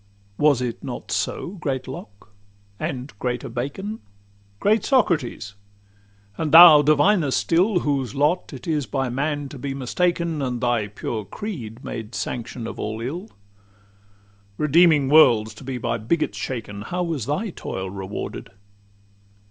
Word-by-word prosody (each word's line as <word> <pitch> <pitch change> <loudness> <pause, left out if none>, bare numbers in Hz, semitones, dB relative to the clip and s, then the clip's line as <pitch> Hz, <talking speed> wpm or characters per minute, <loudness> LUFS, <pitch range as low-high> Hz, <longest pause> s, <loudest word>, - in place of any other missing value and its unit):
Was 145 -4 +4
it 120 -2 -4
not - - -6
so, - - -2
great 135 -5 -3
Locke? 105 -5 -10 0.5
and 130 0 -4
greater 125 -1 -3
Bacon? 145 - -4 0.6
Great 215 +2 +2
Socrates? 155 - +1 0.9
And 155 -2 -1
thou, 165 -2 +10
Diviner 155 +3 +3
still, 175 +7 +2
Whose 135 -6 -1
lot 150 +6 +1
it 130 -4 -9
is 150 -4 0
by 135 -2 -1
man 145 +3 -2
to 135 - -10
be 135 +1 -4
mistaken, 170 +4 -1
And 125 -2 -2
thy 120 -4 0
pure 105 +1 -4
creed 120 - -7
made 115 -1 -6
sanction 120 0 -4
of - - -7
all 110 +1 -3
ill? 165 - -5 1.3
Redeeming 150 -1 +4
worlds 115 -7 +5
to 110 - -13
be 130 -1 -4
by 115 -1 -2
bigots 155 +10 -1
shaken, 110 -5 -5
How 180 +11 -3
was 155 -9 -3
thy 185 +9 -1
toil 95 - -5
rewarded? 95 +1 -6
135 Hz, 140 wpm, -23 LUFS, 120-165 Hz, 1.3 s, thou